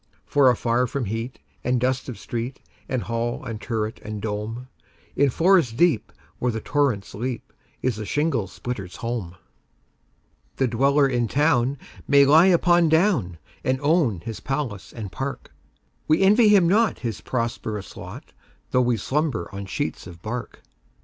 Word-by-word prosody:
For 140 -3 +4
afar 120 +1 +1
from 130 +1 -3
heat 115 +5 -4 0.3
and 125 0 +1
dust 130 +1 -1
of 125 - -6
street, 120 +3 -5 0.3
And 130 -3 -1
hall 115 +1 -3
and 110 -2 -5
turret, 110 -2 -3
and 105 0 -5
dome, 110 +4 -4 0.5
In 140 0 +4
forest 165 -5 +3
deep, 170 -8 +2 0.3
where 125 - +1
the 110 - -3
torrents 130 -6 0
leap, 120 +2 -5 0.3
Is 125 -4 0
the 110 - -5
shingle 145 -9 0
splitter's 100 -3 -6
home. 115 -7 -4 1.2
The 130 - +1
dweller 140 +4 +3
in 120 -3 0
town 140 -1 +2 0.3
may 140 0 +6
lie 160 +6 +7
upon 175 -2 +4
down, 160 - +2 0.3
And 130 0 +1
own 145 - +2
his 110 +4 -6
palace 135 -8 -4
and 105 -5 -7
park:We 145 +4 -4
envy 210 +3 +6
him 195 -5 +6
not 215 +5 +3
his 115 -4 -3
prosperous 115 -4 -3
lot, - - -10 0.4
Though 125 - +4
we 120 -2 +2
slumber 140 +3 -1
on 100 0 -6
sheets 95 - -3
of 85 -1 -12
bark. 120 +2 -6
125 Hz, 150 wpm, -24 LUFS, 110-145 Hz, 1.2 s, lie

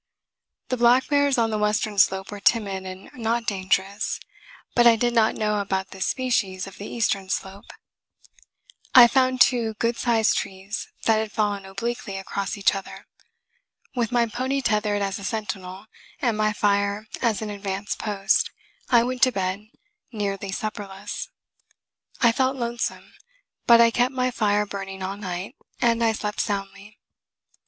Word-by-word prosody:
The 255 - 0
black 240 +2 +4
bears 285 -2 +3
on 225 -1 +2
the 215 - -1
western 210 -1 0
slope 190 +1 +3
were 205 - -6
timid 200 -4 +1
and 185 +1 -9
not 230 -1 -1
dangerous; 195 0 -1 0.5
but 240 -1 +5
I 230 - +7
did 240 +1 0
not 225 -2 +3
know 210 -1 0
about 190 -1 -2
this 190 -1 -3
species 200 -8 -1
of 195 - -12
the 205 - -6
eastern 200 -5 -1
slope. 195 +1 -4 1.3
I 245 -2 +11
found 255 0 +2
two 230 -4 +3
good 230 +2 0
sized 230 -3 +2
trees 195 +2 -6 0.2
that 225 -1 +4
had 220 -1 -2
fallen 205 -3 -1
obliquely 200 0 -4
across 195 +1 -4
each 200 - +3
other. 195 -1 -7 0.9
With 235 -2 0
my 240 -1 +3
pony 260 +4 -2
tethered 210 -2 +1
as 195 0 -2
a - - -9
sentinel, 195 -2 -4 0.3
and 240 -5 +1
my 215 0 +1
fire 205 0 0 0.2
as 225 -3 +1
an 210 - -4
advance 200 0 -4
post, 200 -2 +1 0.4
I 235 -2 +5
went 250 0 -3
to 255 - +6
bed, 195 +1 -3 0.4
nearly 200 -3 -3
supperless. 205 - -5 0.9
I 235 - +6
felt 260 +3 +1
lonesome; 235 -1 -3 0.5
but 235 -1 +8
I 230 0 +6
kept 245 +3 +1
my 255 0 +1
fire 210 -3 +1
burning 195 -1 -6
all 190 +1 -3
night, 190 +4 -6 0.2
and 235 -1 +2
I 225 -1 +3
slept 210 -1 -4
soundly. 200 0 -5
210 Hz, 155 wpm, -24 LUFS, 195-235 Hz, 1.3 s, I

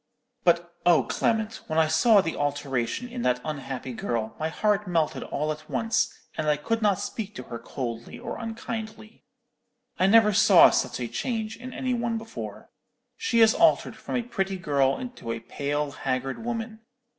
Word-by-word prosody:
"'But, 170 0 +2
oh, 175 -2 +5
Clement, 225 -1 -1
when 155 - -2
I 160 - +5
saw 200 +7 +5
the 165 -2 -3
alteration 140 - -2
in 245 0 -6
that 125 - +2
unhappy 135 -4 -5
girl, 115 -1 -3
my 155 +1 -1
heart 210 +3 +1
melted 165 -4 0
all 150 +2 -2
at 155 0 -8
once, 225 -1 +1 0.2
and 155 - -2
I 150 - +3
could 225 +10 -1
not 205 -3 +3
speak 210 -2 -5
to 125 - -6
her 120 -1 -7
coldly 120 -3 -6
or - - -6
unkindly. 225 -1 -6 0.7
I 185 - +4
never 210 0 +6
saw 195 -3 +7
such - - 0
a 120 - -2
change 220 - -3
in 255 +1 -9
any 255 0 -2
one 235 -1 -1
before. 225 0 -8 0.4
She 235 -10 +1
is 220 0 +7
altered 335 0 +3
from - - -5
a 245 - 0
pretty 195 -5 -2
girl 140 -5 +1
into 245 - -6
a 115 - -3
pale 145 +4 -2
haggard 135 - -3
woman. 225 -1 -4
185 Hz, 175 wpm, -26 LUFS, 145-225 Hz, 0.7 s, saw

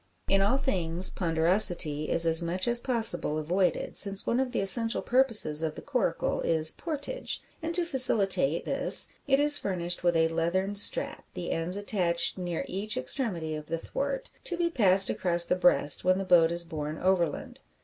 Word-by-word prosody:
In 195 0 +1
all 205 +7 0
things 185 -10 +1
ponderosity 165 -3 +2
is 170 - +3
as 165 0 +2
much 175 +4 -4
as 240 0 +2
possible 230 - +1
avoided, 180 +5 -3
since 200 -1 +3
one 240 - -2
of 265 -1 -3
the - - -3
essential 225 +4 +2
purposes 230 - +1
of 160 -1 -5
the - - -10
coracle 245 -12 -3
is 160 -1 0
"portage;" 315 - -6 0.2
and 325 +1 -5
to 350 -1 -1
facilitate 200 - +2
this - - +4 0.2
it 270 0 +1
is 290 0 +3
furnished 175 -3 -3
with 175 -1 0
a 160 0 +1
leathern 170 +4 -3
strap, 205 - +3
the 175 - -6
ends 170 +4 -3
attached 180 -5 0
near 175 -2 -5
each 200 +3 -4
extremity 165 - -3
of 150 0 -8
the 165 - -4
thwart, - - -6
to 350 - -2
be 340 -1 -2
passed 195 - +2
across 170 -1 +1
the 180 - -1
breast 180 -5 +3
when 185 +1 +1
the 195 - -5
boat 170 -3 +3
is 170 0 -1
borne 155 -2 -7
overland. 175 -4 -3
185 Hz, 180 wpm, -26 LUFS, 165-230 Hz, 0.2 s, this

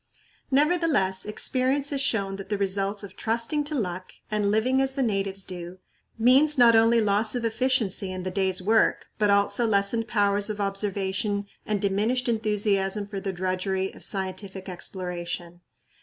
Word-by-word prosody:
Nevertheless, 285 - +2
experience 260 +6 0
has 280 -1 -1
shown 195 -7 0
that 195 -1 -9
the 205 - 0
results 195 +1 0
of 200 -1 -10
"trusting 230 +6 -1
to 300 +1 -3
luck" 185 -6 -4 0.2
and 210 -1 +1
"living 250 +6 +2
as 270 0 0
the 270 -1 0
natives 195 -3 -1
do" 180 0 -8 0.4
means 270 +6 +4
not 235 -2 +6
only 230 +1 +5
loss 210 +2 +1
of 240 -1 -2
efficiency 225 -5 0
in 185 -1 -5
the 185 - -3
day's 190 -1 0
work, 220 +3 +2
but 210 -1 +3
also 200 +4 +2
lessened 215 +2 +2
powers 205 -1 +1
of 210 -1 -4
observation 200 0 -1 0.2
and 210 -1 0
diminished 215 +6 0
enthusiasm 210 -3 +1
for 200 -1 -6
the 195 0 -3
drudgery 185 +1 -2
of - - -8
scientific 190 0 -4
exploration. 175 -1 -5
205 Hz, 155 wpm, -26 LUFS, 190-230 Hz, 0.4 s, not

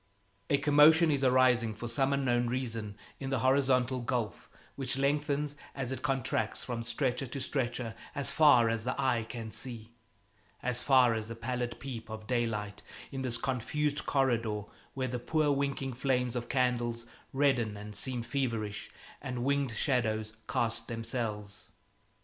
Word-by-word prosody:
A 140 - +4
commotion 150 +3 +6
is 140 -2 +1
arising 125 -3 +4
for 120 +3 -5
some 135 +4 +1
unknown 120 -3 +1
reason 115 -4 -3 0.2
in 135 - -4
the 135 - +1
horizontal 130 -1 +3
gulf 120 -2 -3 0.3
which 135 -1 -1
lengthens 145 +1 0 0.2
as 130 -2 -3
it 130 -1 -4
contracts 130 -5 -1
from 120 -2 -4
stretcher 125 +3 -1
to 135 +3 -5
stretcher 125 -3 -2 0.2
as 140 - +3
far 145 -7 +6
as 115 -1 -1
the 125 +3 -2
eye 125 -4 +2
can 115 -2 -6
see, 115 -3 -5 0.7
as 125 0 +2
far 130 -4 +5
as 110 -1 -3
the 115 - -6
pallid 120 +1 -3
peep 120 -4 -7
of 110 0 -7
daylight, 110 -4 -2 0.3
in 135 -1 -4
this 125 -3 0
confused 145 +4 -1
corridor 115 -6 +1 0.3
where 130 -1 -1
the 125 0 -3
poor 150 +4 +1
winking 140 -1 -1
flames 125 -1 0
of 120 -1 -4
candles 120 -3 0 0.3
redden 130 -7 +1
and 105 +1 -8
seem 125 +2 -1
feverish, 115 -4 -2 0.3
and 125 -1 -4
winged 140 0 +1
shadows 110 -5 0
cast 115 -1 -1
themselves. 115 -3 -4
125 Hz, 150 wpm, -31 LUFS, 115-135 Hz, 0.7 s, commotion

